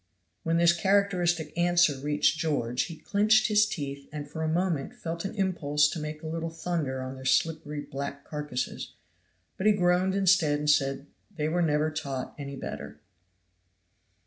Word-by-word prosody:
When 165 0 +1
this 170 0 +5
characteristic 175 -4 +1
answer 175 -3 +3
reached 150 +2 +1
George 125 -7 0
he 165 - -8
clinched 215 +3 +3
his 210 0 +4
teeth 140 -7 -5
and 145 -1 -6
for 160 +2 -6
a 160 - 0
moment 170 -4 -1
felt 165 +2 -5
an 195 - -4
impulse 150 -7 +2
to 170 - -4
make 150 +1 -6
a - - -5
little 165 +1 -3
thunder 160 -5 -3
on 130 0 -5
their 130 0 -10
slippery 150 +2 0
black 140 0 -6
carcasses, 145 -4 -4 0.6
but 195 - 0
he 215 - +6
groaned 180 0 +2
instead 180 -6 +3
and 150 0 -1
said, 135 -2 +1 0.3
"They 150 -2 -1
were 175 +3 +1
never 155 -1 +2
taught 140 -4 -4
any 140 -1 -6
better." 130 - -7
160 Hz, 165 wpm, -28 LUFS, 145-175 Hz, 0.6 s, he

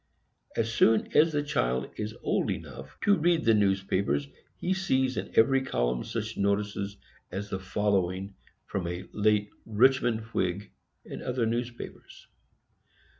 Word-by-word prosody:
As 115 0 0
soon 110 -1 +3
as 155 0 +5
a 145 - +1
child 65 - -1
is 105 0 -4
old - - +1
enough 65 +2 -6
to 205 -3 +4
read 165 -1 +2
the 115 - +6
newspapers, 95 -7 +1 0.3
he 185 - 0
sees 130 -9 +1
in - - -3
every 135 +4 +5
column - - 0
such 110 0 -4
notices 100 0 -1 0.3
as 100 +2 -5
the 95 - -2
following 95 0 0 0.3
from 90 -3 -3
a 90 +2 -5
late 105 -1 +2
Richmond 120 +1 +3
Whig, 95 +3 -1 0.3
and - - -7
other 125 -2 -1
papers. 120 +1 -5
105 Hz, 135 wpm, -28 LUFS, 95-125 Hz, 0.3 s, the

